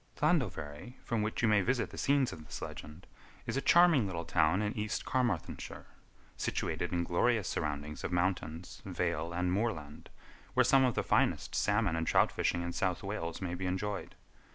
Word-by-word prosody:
Llandovery, 95 - -1
from 115 -2 -1
which 105 +1 -1
place - - -2
you - - +5
may 105 -2 +4
visit 120 +5 0
the - - -9
scenes 140 -2 +2
of 80 - -10
this - - -7
legend, 75 +4 -8 0.4
is - - -3
a 135 - +1
charming 170 - +5
little 85 -3 -4
town 80 +2 +3
in 105 +1 -2
East 105 -2 -2
Carmarthenshire, 120 -10 -2 0.5
situated - - -2
in 85 -1 0
glorious 105 +5 +1
surroundings 75 0 -3
of - - -3
mountains, 90 -1 -2
vale, 85 -3 -2
and 90 +1 0
moorland, 85 -9 -3 0.5
where - - +6
some 135 -1 +5
of 125 - +1
the - - 0
finest - - +1
salmon 105 -4 +2
and 80 0 -2
trout - - +4
fishing 85 0 0
in 85 0 -4
South 95 0 -1
Wales 95 -3 -4
may 90 -2 -2
be 90 +1 -3
enjoyed. 100 +2 -3
95 Hz, 180 wpm, -32 LUFS, 85-110 Hz, 0.5 s, where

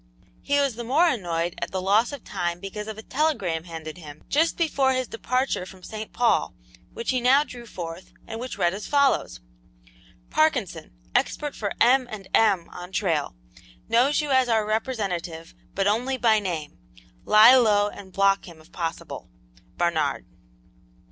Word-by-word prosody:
He 285 0 +1
was 280 -3 +1
the 240 - -4
more 290 +9 +3
annoyed 175 - -1
at - - -2
the 190 - -3
loss 205 +7 +2
of 285 -3 -8
time 175 0 -3
because 210 +3 -6
of 220 -1 -6
a 220 - -9
telegram 205 - -1
handed 160 -1 -8
him 150 -2 -12
just 320 +3 +2
before 280 -5 +2
his 255 -1 -1
departure 255 -1 -1
from 185 0 -13
St. 215 +2 -7
Paul, 240 -1 +1 0.4
which 235 - -3
he 255 -1 0
now 265 +4 +5
drew 240 -5 -11
forth, 170 -2 -8
and 225 - -7
which 250 -3 -6
read 175 -2 +2
as 205 +2 -6
follows: 280 - +1 0.9
"Parkinson, - - 0 0.2
expert 295 -1 0
for 205 -2 -3
M. 255 +1 +4
and 205 -4 -8
M. 200 -6 +3
on 180 +1 -9
trail. 165 - -1 0.5
Knows 265 +6 +3
you 295 -2 -3
as 260 -2 +3
our 220 -2 +2
representative, 195 -7 -3 0.2
but 195 - 0
only 245 +6 +1
by 225 -3 +4
name. 170 -7 -5 0.4
Lie 215 +4 +8
low 210 -5 +4
and 200 -2 -10
block 195 +1 +2
him 170 -2 -12
if 160 +2 -20
possible. 165 -1 -5 0.5
"BARNARD." 170 -2 0
215 Hz, 165 wpm, -25 LUFS, 180-255 Hz, 0.9 s, Lie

